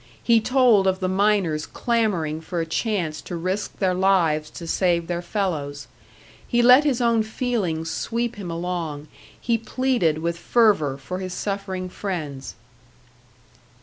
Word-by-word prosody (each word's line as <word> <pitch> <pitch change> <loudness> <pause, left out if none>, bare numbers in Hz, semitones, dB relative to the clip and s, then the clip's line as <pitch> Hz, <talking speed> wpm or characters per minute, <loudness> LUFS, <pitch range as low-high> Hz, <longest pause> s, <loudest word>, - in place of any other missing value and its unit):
He 230 -2 +4
told 240 -5 +4
of 190 0 +1
the 185 - -1
miners 190 -5 +1
clamouring 190 -10 -1
for 170 +2 -4
a 165 - -1
chance 165 -3 -2
to 175 - -7
risk 185 +5 -3
their 185 -2 +1
lives 175 -5 +2
to 170 - -9
save 170 0 +1
their 175 0 -3
fellows. 160 -7 -3 0.6
He 240 0 +2
let 250 +4 +8
his 270 -4 +1
own 235 -2 +3
feelings 215 -8 -2
sweep 235 0 -2
him 195 -4 -6
along; 165 -3 -4 0.3
he 230 -1 0
pleaded 230 -8 0
with 170 +1 -3
fervour 195 - +2
for 180 +7 -6
his 185 -1 -5
suffering 195 -2 -3
friends. 155 -8 -5
185 Hz, 145 wpm, -23 LUFS, 165-220 Hz, 0.6 s, let